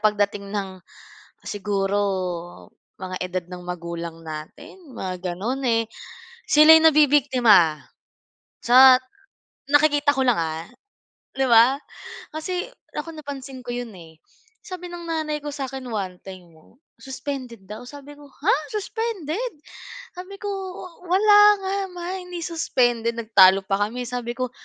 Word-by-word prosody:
pagdating 205 -1 0
ng 195 -2 -4 0.7
siguro 200 -1 -1 1.0
mga 185 -1 -5
edad 180 -1 -3
ng 180 0 -8
magulang 170 -1 -6
natin, 160 - -10
mga 185 -2 -4
gano'n, 240 +9 -3
eh, 230 -1 +2 0.7
sila'y 310 +2 +8
nabibiktima, 255 - +4 0.8
sa 255 +2 +8 0.8
nakikita 290 0 +4
ko 265 - 0
lang 240 - +3
ha, 160 0 -3 0.7
'di 270 0 +1
ba? 235 +4 +6 0.6
Kasi 360 +5 -3 0.3
ako 330 - -5
napansin 275 -4 -8
ko - - -4
'yon, 245 -3 -5
eh. 160 -2 -15 0.4
Sabi 360 -2 -8
ng 345 -1 -8
nanay 310 -2 -2
ko 295 - -5
sa 275 -2 -4
'kin 265 -1 -7
one 190 -5 -4
time 185 -2 -11
'no, 160 +9 -23 0.2
suspended 260 -5 -7
daw, 215 +4 -8
sabi 285 0 -11
ko 290 - -14
"Ha! 330 - +1 0.2
suspended?" 430 -1 -3 0.6
Sabi 370 +2 -9
ko, 410 - -4 0.6
"Wala 410 +4 +5 0.3
nga 385 +1 -2 0.2
ma, 350 -1 -7
hindi 360 -1 -7
suspended." 240 -8 0
Nagtalo 195 -4 +5
pa 195 +1 0
kami. 250 +2 -5
Sabi 245 -1 -4
ko, 255 0 -2
250 Hz, 130 wpm, -23 LUFS, 195-305 Hz, 1.0 s, sila'y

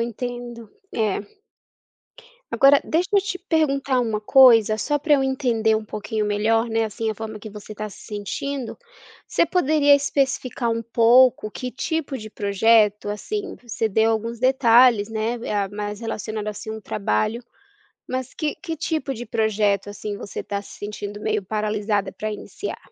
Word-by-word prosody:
entendo. 240 0 -5 0.2
É. 215 -3 0 1.3
Agora 275 +1 +6
deixa 350 +5 -1
eu 400 - +5
te 380 -1 -4
perguntar 275 -7 +1
uma 220 -3 -2
coisa, 225 -3 +6
só 295 +6 0
pra 300 +1 0
eu 270 - +2
entender 240 -5 +1
um 215 - -4
pouquinho 215 +1 -3
melhor, 215 +3 +1
né, 225 -1 0
assim, 220 +1 -3
a - - -4
forma 220 0 -7
que 215 +1 -9
você 210 +1 -10
tá 215 0 -5
se - - -13
sentindo. 230 +5 -4 0.5
Você - - +2
poderia 300 -4 +4
especificar 270 -4 0
um 230 0 -1
pouco 235 0 +4
que 250 +3 -5
tipo 310 0 -3
de 215 -3 -9
projeto 210 0 +2
assim, 395 - -4
você 230 -1 -2
deu 220 +2 +2
alguns 230 +1 -3
detalhes, 240 -4 +5
né, 220 +2 -1
eh, 205 -3 -1
mais 205 0 -5
relacionado, 215 -2 -4
assim, 220 +1 -6
ao 220 - -7
trabalho, 205 - -1 0.7
mas 255 0 -3
que, 305 -2 -2
que 330 -4 -6
tipo 315 -3 -2
de 240 0 -7
projeto, 210 -3 0
assim, 205 0 -6
você 200 - -6
tá 200 0 -3
se - - -13
sentindo 205 0 -6
meio 215 -1 0
paralisada 210 0 -1
pra 215 - -4
iniciar? 210 - -6
225 Hz, 160 wpm, -23 LUFS, 210-260 Hz, 1.3 s, Agora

